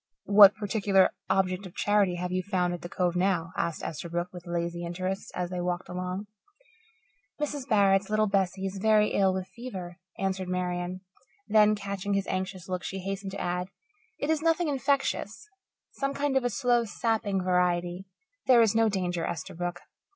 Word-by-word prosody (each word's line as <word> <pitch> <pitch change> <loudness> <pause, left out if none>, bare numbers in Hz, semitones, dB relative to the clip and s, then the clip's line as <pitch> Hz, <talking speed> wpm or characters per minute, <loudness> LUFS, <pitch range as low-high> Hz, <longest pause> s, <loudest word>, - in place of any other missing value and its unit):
"What 200 0 +8
particular 205 -2 +2 0.2
object 190 0 +1
of 175 - -15
charity 205 -3 +2
have 180 +1 -3
you 185 0 0
found 180 -2 0
at 175 - -6
the 175 - -7
Cove 180 -1 0
now?" 180 -2 0
asked 170 - -2
Esterbrook, 170 +3 -4
with 175 0 -10
lazy 170 0 -2
interest, 185 +3 -4
as 180 0 -3
they 180 -1 -2
walked 175 0 -2
along. 180 +2 -4 1.1
"Mrs. 290 -2 -3
Barrett's 195 -2 +4
little 215 0 +3
Bessie 195 -1 0
is 195 0 -4
very 215 0 +4
ill 195 -1 +3
with 185 0 -3
fever," 190 -8 -8 0.2
answered 190 -1 -2
Marian. 180 0 -2 0.5
Then, 215 0 +5
catching 200 -1 -3
his 195 -1 0
anxious 185 -1 -4
look, 185 -1 -2
she 195 - -4
hastened 195 +1 -4
to 200 - -5
add, 180 +1 -2 0.5
"It 290 - -1
is 315 -1 +1
nothing 330 0 +2
infectious 275 - -1 0.4
some 275 0 -3
kind 285 -1 0
of 265 - +3
a 245 - +1
slow, 240 +1 +2
sapping 220 -2 -1
variety. 180 0 0 0.4
There 245 -3 +7
is 220 - +2
no 225 -1 +3
danger, 180 -4 -1
Esterbrook." 175 +1 -4
190 Hz, 170 wpm, -28 LUFS, 180-210 Hz, 1.1 s, What